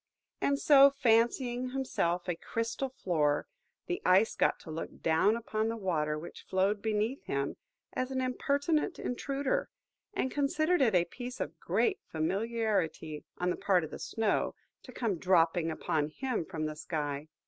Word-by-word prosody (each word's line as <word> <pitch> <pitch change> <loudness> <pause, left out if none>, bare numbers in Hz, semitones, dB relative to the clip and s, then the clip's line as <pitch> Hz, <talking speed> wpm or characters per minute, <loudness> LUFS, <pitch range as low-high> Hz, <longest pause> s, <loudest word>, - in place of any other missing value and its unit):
And 280 0 +2
so, 280 -1 +7
fancying 245 0 +2
himself 180 -10 -1
a 175 - +1
crystal 230 +8 -3
floor, 155 - 0 0.4
the 355 0 -3
Ice 190 +5 +4
got - - +2
to 160 - -9
look 160 +1 -6
down 165 +7 +4
upon 220 -1 -1
the 230 - -3
Water 155 -7 0
which 160 +3 -9
flowed 195 +3 +1
underneath 220 +5 -1
him, 140 0 -1 0.4
as 255 0 -1
an 265 -1 -2
impertinent 285 +6 0
intruder; 270 +2 -1 0.5
and 260 -9 0
considered 310 +4 +1
it 225 -7 +4
a 175 -1 +4
piece 245 +7 -7
of - - -4
great 405 -3 +1
familiarity, 185 -3 -1
on 180 0 0
the - - -1
part 185 -4 +2
of 155 - -6
the - - -7
Snow, 220 -2 0 0.3
to 255 - -12
come 220 -9 -2
dropping 170 -2 +3
upon 155 -1 -1
him 230 - -3
from 160 -4 -4
the 155 0 -3
sky. 150 -2 -3
215 Hz, 160 wpm, -31 LUFS, 165-255 Hz, 0.5 s, so